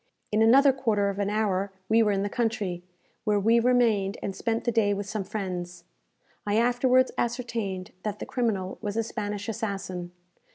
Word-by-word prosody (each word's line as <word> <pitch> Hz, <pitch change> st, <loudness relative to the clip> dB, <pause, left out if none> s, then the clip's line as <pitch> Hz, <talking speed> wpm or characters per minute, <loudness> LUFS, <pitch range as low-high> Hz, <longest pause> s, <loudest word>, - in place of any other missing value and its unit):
In 215 Hz, +1 st, +2 dB
another 270 Hz, +5 st, +6 dB
quarter 215 Hz, -6 st, +1 dB
of 200 Hz, 0 st, -4 dB
an 200 Hz, 0 st, 0 dB
hour 200 Hz, -2 st, 0 dB, 0.2 s
we 225 Hz, +2 st, +4 dB
were 210 Hz, -2 st, +3 dB
in 195 Hz, -1 st, 0 dB
the -, -, 0 dB
country, 205 Hz, -6 st, -1 dB, 0.4 s
where 210 Hz, -1 st, +2 dB
we 225 Hz, +4 st, +4 dB
remained 230 Hz, -5 st, +2 dB
and 195 Hz, -, -3 dB
spent 230 Hz, +3 st, -1 dB
the 240 Hz, -, +1 dB
day 210 Hz, -3 st, +2 dB
with 200 Hz, 0 st, -4 dB
some 210 Hz, 0 st, -3 dB
friends. 180 Hz, -3 st, -5 dB, 0.6 s
I 205 Hz, +1 st, 0 dB
afterwards 250 Hz, +2 st, +3 dB
ascertained 230 Hz, -6 st, -2 dB
that 210 Hz, 0 st, -3 dB
the -, -, -6 dB
criminal 205 Hz, -7 st, -2 dB
was 205 Hz, +1 st, -3 dB
a 225 Hz, -, +2 dB
Spanish 205 Hz, -2 st, -4 dB
assassin. 195 Hz, -5 st, -4 dB
210 Hz, 175 wpm, -27 LUFS, 195-230 Hz, 0.6 s, another